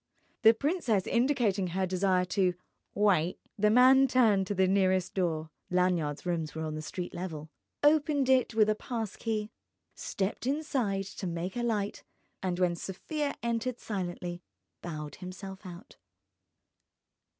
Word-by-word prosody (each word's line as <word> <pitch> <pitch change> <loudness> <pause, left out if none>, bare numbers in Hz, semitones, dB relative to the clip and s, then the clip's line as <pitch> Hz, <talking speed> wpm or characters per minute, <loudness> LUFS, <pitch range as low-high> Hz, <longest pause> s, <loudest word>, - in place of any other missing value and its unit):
The 225 -1 +7
princess 255 - 0
indicating 235 -7 +1
her 190 +2 -1
desire 185 0 +1
to 180 -1 +1 0.4
wite, 185 -5 +2 0.2
the 210 +1 +3
man 260 +4 +6
turned 220 -7 +3
to 205 - -2
the 190 0 +3
nearest 185 -1 +2
door 160 -4 -1 0.2
(Lanyard's 180 -5 0
rooms 165 -3 -2
were 160 - -3
on 155 -1 -3
the 155 - -4
street 175 +3 -5
level), 160 -4 -6 0.3
opened 295 -2 +3
it 255 -3 +3
with 215 -1 +5
a 215 - +3
pass 220 -1 -4
key, 215 -2 -3 0.4
stepped 200 +5 -3
inside 260 -9 0
to 190 -1 -6
make 170 +2 -4
a 240 - -1
light, 210 -4 -1 0.4
and 180 -2 -1
when 180 -1 +2
Sofia 285 - -3
entered 235 +1 -1
silently 175 -3 -4 0.4
bowed 150 -4 -6
himself 190 +1 -8
out. 175 +2 -11
195 Hz, 140 wpm, -30 LUFS, 180-230 Hz, 0.4 s, The